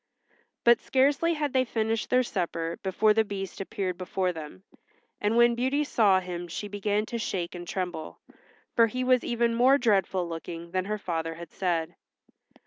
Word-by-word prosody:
But 235 0 +5
scarcely 285 +5 +2
had 295 -3 -2
they 260 -1 +4
finished 225 -2 -1
their 255 0 +4
supper 170 -6 -3
before 210 +3 +3
the 220 +1 +3
Beast 195 -2 -6
appeared 190 -2 -3
before 185 0 -1
them, 150 - -9 0.6
and 210 +3 +1
when 235 0 +6
Beauty 260 +5 +1
saw 210 -9 +3
him 175 -1 -6
she 205 +5 -5
began 205 +1 -1
to 235 +1 -4
shake 180 -5 -3
and 175 -1 -8
tremble, 180 -4 -4 0.6
for 230 -1 +6
he 255 +3 -3
was 255 -1 +3
even 235 -1 +1
more 255 +4 +5
dreadful 195 -7 +1
looking 170 0 -7
than 185 0 -1
her 210 +1 -2
father 165 -4 -3
had 170 -1 -10
said. 170 -4 -1
205 Hz, 170 wpm, -27 LUFS, 175-235 Hz, 0.6 s, when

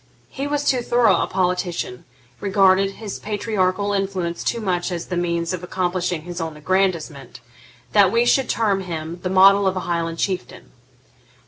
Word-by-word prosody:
He 275 +1 -4
was 290 0 -1
too 255 -2 +2
thorough 240 -3 +3
a - - -1
politician, 180 -8 -2 0.3
regarded 195 -1 +3
his 210 -2 -7
patriarchal 205 -2 -1
influence 190 -4 -2
too 235 - -1
much 185 -4 -1
as 170 -1 -4
the 180 - -4
means 170 -1 -1
of 180 -1 -5
accomplishing 180 -2 -2
his 175 0 -6
own 160 -2 -5
aggrandisement, 165 -6 -1 0.5
that 200 -3 +5
we 235 +1 +3
should 260 +1 +2
term 205 -4 +1
him 165 -1 -6
the 185 - -2
model 195 +1 +6
of 190 0 0
a - - -1
Highland 165 -1 -2
Chieftain. 185 +1 -4
185 Hz, 160 wpm, -21 LUFS, 175-200 Hz, 0.5 s, model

